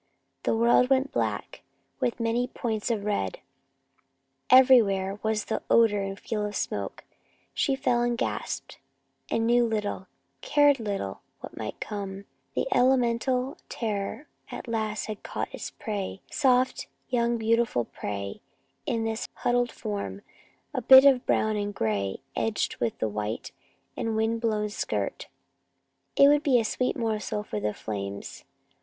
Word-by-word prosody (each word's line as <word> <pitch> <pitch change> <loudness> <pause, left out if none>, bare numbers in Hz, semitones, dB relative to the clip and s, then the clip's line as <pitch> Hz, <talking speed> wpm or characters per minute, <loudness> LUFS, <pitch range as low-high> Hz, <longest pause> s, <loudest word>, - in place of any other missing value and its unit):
The - - +1
world 235 +2 +4
went 270 +1 +2
black, - - -2 0.4
with 250 -2 -1
many 235 +2 +1
points 220 -2 -3
of 220 -4 -1
red. 150 - -1 1.1
Everywhere 210 -7 +5
was 220 -1 0
the - - -2
odor 220 -3 +5
and 195 0 -4
feel 215 -2 -3
of 210 0 -3
smoke. - - -3 0.5
She 275 - +1
fell 250 -3 +1
and 240 0 +1
gasped, - - -3 0.5
and 225 - +1
knew 240 +1 +4
little, 210 -4 -2 0.3
cared 290 -2 +4
little 200 - -3 0.2
what - - -9
might - - -6
come. 200 -1 -5 0.3
The - - +1
elemental 250 +1 +2
terror 215 +5 -3 0.2
at - - -7
last 220 -2 -2
had 215 -1 -6
caught - - -4
its - - -5
prey 200 -3 -5
soft, 255 -2 +2 0.2
young, 235 -1 +1
beautiful 225 - +1
prey, 100 -2 -5 0.5
this 225 0 -1
huddled 245 0 +1
form, 100 -1 -5 0.5
a - - -1
bit 265 +1 +9
of 265 -2 +5
brown 220 0 +2
and 205 0 -3
gray, 100 -3 -1
edged 225 -2 -1
with 115 -2 -2
white 105 0 -3 0.4
of - - -3
wind 225 +1 0
blown 215 -2 0
skirt. 205 - -3 0.9
It 280 - +7
would 290 0 +5
be 270 -5 +4
a 225 - -1
sweet 250 +3 -1
morsel 215 -3 -2
for 105 - -4
the 105 0 -1
flames. 100 -2 -6
225 Hz, 140 wpm, -27 LUFS, 200-245 Hz, 1.1 s, bit